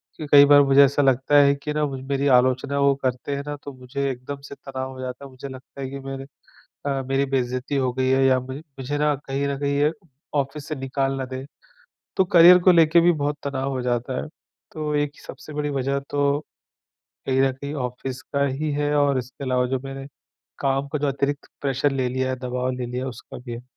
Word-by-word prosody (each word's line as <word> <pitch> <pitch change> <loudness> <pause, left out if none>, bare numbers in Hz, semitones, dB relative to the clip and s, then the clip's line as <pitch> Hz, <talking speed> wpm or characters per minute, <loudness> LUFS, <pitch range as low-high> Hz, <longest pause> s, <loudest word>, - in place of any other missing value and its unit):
क्यों 155 - -7
कई 145 -1 +9
बार 145 0 +7
मुझे 140 0 +6
ऐसा 140 +1 +3
लगता 135 +1 +3
है 140 0 +5
कि 150 +1 -5
ना 150 0 +1
मुझ 135 -2 -4
मेरी 140 +1 +1
आलोचना 130 +2 +1
वो 140 0 +4
करते 130 +2 -1
हैं 140 - -4
ना, 145 - -3
तो 145 0 -9
मुझे 135 +2 -3
एकदम 135 +3 -7
से 140 - -9
तनाव 130 -1 -6
हो 130 - -11
जाता 130 +2 -6
है। - - -10
मुझे 130 +2 -8
लगता 130 +1 -11
है 130 - -4
कि 140 +1 -6
मैंने 135 0 -6 0.6
अ, 135 -1 0
मेरी 135 +1 +2
बेइज़्जती 130 +1 -1
हो 130 -2 +1
गई 130 +1 0
है 135 0 +3
या 130 -1 +4
मे 130 +1 -7
मुझे 145 -2 -6
ना 150 0 +2
कहीं 140 0 -3
न 140 - -1
कहीं 140 0 0
ये 150 +1 +3 0.5
ऑफ़िस 140 +2 -5
से 155 - -2
निकाल 135 0 -1
ना 135 - -3
दें। 130 +1 -6 0.7
तो 190 - +4
करियर 175 0 +8
को 185 - +7
लेके 165 0 +5
भी 175 +1 +5
बहुत 145 -1 -1
तनाव 135 -1 -2
हो 130 -2 -2
जाता 125 +1 -1
है। - - -7 0.4
तो 150 -1 -3
एक 145 0 -1
सबसे 155 +2 -10
बड़ी 150 0 -2
वज़ह 140 0 -1
तो 145 0 +1 0.9
कहीं 130 0 +2
न 135 -1 +3
कहीं 140 +2 -7
ऑफिस 125 0 -4
का 140 -3 -1
ही 145 +3 -2
है, 145 +1 0
और 140 -2 +3
इसके 130 +3 -7
अलावा 125 -1 +1
जो 130 +1 -1
मैंने 135 0 -7 0.5
काम 135 0 0
का 150 - -2
जो 145 0 0
अतिरिक्त 140 +1 -2
प्रेशर 140 +1 +1
ले 130 -2 0
लिया 130 +1 -1
है, 130 - -2
दबाव 125 0 -2
ले 125 -1 -4
लिया 125 +2 -4
है, - - -3
उसका 120 - -11
भी 120 -1 -8
है। 120 +1 -6
135 Hz, 230 wpm, -23 LUFS, 130-145 Hz, 0.9 s, कई